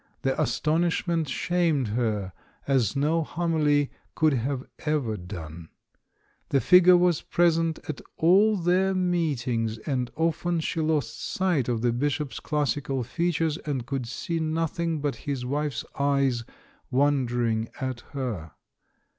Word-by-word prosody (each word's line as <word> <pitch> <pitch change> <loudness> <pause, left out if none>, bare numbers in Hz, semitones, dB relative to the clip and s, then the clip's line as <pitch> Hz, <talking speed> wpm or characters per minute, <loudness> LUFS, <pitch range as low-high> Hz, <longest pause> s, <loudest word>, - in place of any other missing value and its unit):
The 135 0 +1
astonishment 165 +4 0
shamed 160 -6 +1
her 105 -4 -1 0.3
as 130 -7 +2
no 155 +4 +2
homily 155 -3 +1 0.2
could 155 -2 +3
have 130 +1 -1 0.2
ever 145 -8 -1
done. 85 -3 -8 0.8
The 140 - +3
figure 180 +3 +7
was 175 -2 +2
present 165 -2 +2
at 155 - -5 0.2
all 200 +6 +5
their 185 +2 +2
meetings, 135 -11 0
and 125 +1 -2
often 165 +1 0
she 160 0 -2
lost 155 -6 -1
sight 175 -10 0
of 115 -1 -1
the 120 -1 +2
Bishop's 145 +2 -1
classical 145 -3 -1
fea 170 +9 -1
tures 160 -1 -1
and 135 -5 -2
could 130 -2 -3
see 165 +8 -3
nothing 160 0 -1
but 145 -1 -1
his 135 -3 -2
wife's 145 +2 -2
eyes 140 -4 +1 0.4
wondering 120 -5 +1
at 130 -2 -3
her. 110 - -4
145 Hz, 130 wpm, -26 LUFS, 125-165 Hz, 0.8 s, figure